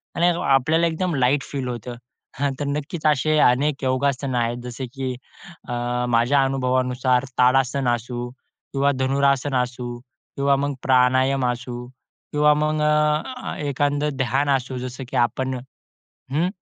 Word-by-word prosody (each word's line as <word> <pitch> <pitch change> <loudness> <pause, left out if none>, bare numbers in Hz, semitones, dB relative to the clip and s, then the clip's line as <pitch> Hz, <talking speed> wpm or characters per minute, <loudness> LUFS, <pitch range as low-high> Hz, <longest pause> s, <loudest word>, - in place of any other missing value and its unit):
आणि 170 +1 +3 0.2
आपल्याला 155 +5 +3
एकदम 170 +1 -1
लाईट 135 +2 +2
फील 135 -3 -3
होतं. 120 0 -5 0.4
हां, 140 -1 +1
तर 145 - -2
नक्कीच 150 +3 -4
असे 155 +1 +3
अनेक 140 +2 +3
योगासनं 130 0 0
आहेत, 120 0 0
जसे 125 +1 -5
की 135 -2 -3 0.6
अ, 120 0 -1
माझ्या 120 +4 +3
अनुभवानुसार 130 -1 +1
ताडासन 130 +1 +3
असू 120 +1 -5
किंवा 135 +2 -3
धनुरासन 140 +1 +1
असू 120 0 -6
किंवा 140 +2 -2
मग 140 +1 -1
प्राणायाम 130 +1 +3
असू 125 0 -6
किंवा 150 +3 -1
मग 155 +1 0
अ, 150 0 +3 0.2
अ, - - -4
एखादं 145 0 0
ध्यान 135 +3 0
असू 130 0 -6
जसं 130 +1 -6
की - - -2
आपण 130 +2 -3 0.7
हं. 160 +5 +1
135 Hz, 135 wpm, -22 LUFS, 125-145 Hz, 0.7 s, आणि